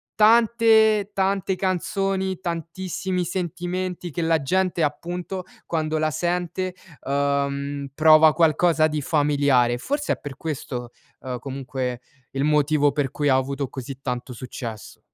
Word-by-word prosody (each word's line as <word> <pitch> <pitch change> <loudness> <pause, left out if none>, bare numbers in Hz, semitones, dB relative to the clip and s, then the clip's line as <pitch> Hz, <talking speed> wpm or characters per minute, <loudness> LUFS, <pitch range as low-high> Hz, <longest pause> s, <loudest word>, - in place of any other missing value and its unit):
tante, 220 -2 +5
tante 195 0 0
canzoni, 190 0 -1
tantissimi 180 +1 -3
sentimenti 180 0 -3
che 170 - -3
la 165 -1 +2
gente 185 +4 0
appunto, 175 +5 -3 0.2
quando 155 -1 -1
la 155 0 +1
sente, 175 +3 -2 0.3
uhm, 140 0 -1
prova 155 +1 +7
qualcosa 160 -1 +3
di 150 -1 -2
familiare. 140 -5 +2
Forse 285 - -1
é - - -6
per 140 -3 -8
questo, 125 -6 -5 0.3
uhm, 125 -2 -5
comunque 130 -2 -4 0.4
il 135 - 0
motivo 150 -1 +3
per 140 -2 -1
cui 145 0 0
ha 130 - +5
avuto 135 +1 -1
così 130 0 -7
tanto 125 -1 -4
successo. 115 -3 -8
155 Hz, 125 wpm, -23 LUFS, 140-185 Hz, 0.4 s, prova